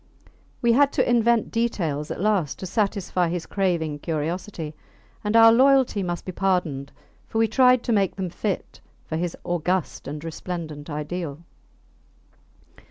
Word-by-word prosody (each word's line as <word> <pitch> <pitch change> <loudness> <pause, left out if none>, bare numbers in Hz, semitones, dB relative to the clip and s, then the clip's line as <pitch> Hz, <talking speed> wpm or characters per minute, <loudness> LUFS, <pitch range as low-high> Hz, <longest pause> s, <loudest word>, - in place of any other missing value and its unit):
We 235 -1 +5
had 280 +3 +4
to - - +2
invent 235 -1 +3
details 170 -11 -1
at - - -5
last 195 -7 +1
to - - -6
satisfy 190 -3 0
his 175 -1 -3
craving 170 -6 -1
curiosity; 165 +1 -3 0.5
and 210 +1 -1
our 225 0 +9
loyalty 265 -4 +4
must 175 -2 -3
be 185 - -4
pardoned, 175 -8 -1 0.4
for - - -4
we 225 0 +4
tried 250 +1 +4
to - - -1
make 195 -3 +1
them 185 -3 -4
fit 200 +1 -4 0.2
for 160 - -4
his 170 +1 -2
august 175 0 -1
and 150 +2 -6
resplendent 165 -2 -6
ideal. 150 0 -4
180 Hz, 145 wpm, -24 LUFS, 160-220 Hz, 0.5 s, our